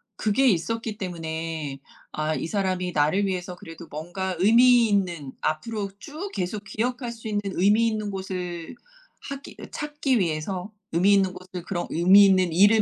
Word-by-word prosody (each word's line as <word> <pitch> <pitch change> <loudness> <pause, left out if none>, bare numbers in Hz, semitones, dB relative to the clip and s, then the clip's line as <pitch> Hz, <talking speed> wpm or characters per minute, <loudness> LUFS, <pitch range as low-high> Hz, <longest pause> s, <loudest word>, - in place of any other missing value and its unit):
그게 220 +6 +2
있었기 225 +3 -1
때문에 160 -5 -4 0.3
아 155 +1 -1
이 - - -3
사람이 185 -1 -1
나를 155 +7 +2
위해서 180 -1 -3
그래도 165 -1 -11
뭔가 175 +5 -4
의미 235 +4 +6
있는 175 -9 0
앞으로 200 +6 -2
쭉 320 - -7
계속 200 +3 -3
기억할 245 +2 -2
수 225 -1 -9
있는 205 -1 0 0.2
의미 210 +5 +4
있는 215 -2 -2
곳을 180 -1 -5 0.5
하기 275 0 -8
찾기 295 -5 0
위해서 180 +4 -2 0.2
의미 185 +5 +4
있는 190 -2 +3
곳을 185 -1 -8
그런 175 -2 -3
의미 190 +5 +7
있는 185 -3 +3
일을 205 +5 +6
190 Hz, 310 characters per minute, -25 LUFS, 175-220 Hz, 0.5 s, 의미